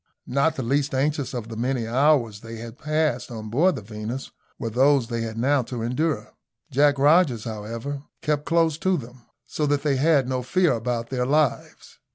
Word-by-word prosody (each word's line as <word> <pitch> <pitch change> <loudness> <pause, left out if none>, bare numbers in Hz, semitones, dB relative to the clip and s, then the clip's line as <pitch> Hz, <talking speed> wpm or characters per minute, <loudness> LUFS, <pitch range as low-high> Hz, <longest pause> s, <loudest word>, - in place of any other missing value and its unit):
Not 140 +5 +1
the 130 - -3
least 135 +3 0
anxious 145 +1 0
of 120 -4 -5
the 115 - -7
many 125 +2 -1
anxious 115 +1 -5
hours 130 -6 +3
they 115 0 -8
had 115 +2 -9
passed 155 -5 0
on 110 -3 -7
board 170 +10 +3
the - - -7
Venus 110 +5 -6 0.3
were 115 -4 -4
those 135 +2 +4
they 115 -1 -2
had 115 -1 -4
now 135 +4 +2
to 120 -1 -5
endure. 145 +6 -1 0.4
Jack 140 +1 +4
Rogers, 145 -5 +4
however, 115 +6 -5 0.2
kept 150 -1 0
close 165 -2 +2
to 190 0 +1
them, 120 -1 -11 0.2
so 150 - -2
that 145 0 +1
they 145 -3 +1
had 145 -2 +3
no 130 -1 -1
fear 175 +8 +2
about 115 0 -3
their 125 -1 0
lives. 150 -2 -1
130 Hz, 195 wpm, -24 LUFS, 115-145 Hz, 0.4 s, those